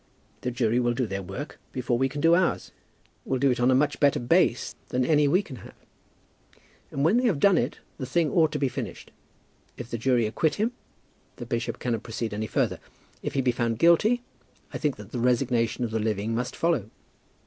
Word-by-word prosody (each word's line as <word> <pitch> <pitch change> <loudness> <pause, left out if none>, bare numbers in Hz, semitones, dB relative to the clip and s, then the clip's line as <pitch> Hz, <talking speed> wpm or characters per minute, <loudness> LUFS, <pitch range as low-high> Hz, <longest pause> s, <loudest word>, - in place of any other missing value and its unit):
The - - -2
jury 120 -1 +1
will 120 -1 +1
do 130 0 0
their 100 -2 -4
work 95 - -7
before 125 -1 -1
we 135 +2 +1
can 145 +2 -5
do 165 +2 +5
ours, 180 +1 +1 0.5
will 130 - -1
do 135 +1 +3
it 125 - -1
on 125 +1 +3
a 130 - +5
much 145 +2 +1
better 145 -1 +3
base 120 - +2
than 125 0 0
any 150 0 +4
we 180 +8 +3
can 135 -9 -9
have; 105 - -13 1.1
and, 140 +1 -1
when 190 +9 +4
they 250 - +2
have 190 - +2
done 195 +4 +5
it, - - -2 0.2
the 130 - -4
thing 160 +2 +1
ought 160 -4 +3
to - - 0
be 140 -1 +1
finished. 125 - -6 0.7
If 120 -1 -8
the 115 - -3
jury 120 -1 +2
acquit 145 +8 0
him, 220 +4 0 0.6
the 120 - -7
bishop 115 0 -2
cannot 115 -3 -2
proceed 115 -1 -4
any 110 +1 -3
further. - - 0 0.4
If - - -4
he 135 - +2
be 125 -1 +2
found 115 -2 -1
guilty 210 - +4 0.5
I - - -4
think 150 -4 0
that 105 -2 -12
the 125 - -3
resignation 120 -1 +1
of 115 - -2
the 110 - -1
living 110 0 -1
must 125 +2 -2
follow." 155 - 0
125 Hz, 215 wpm, -26 LUFS, 115-150 Hz, 1.1 s, do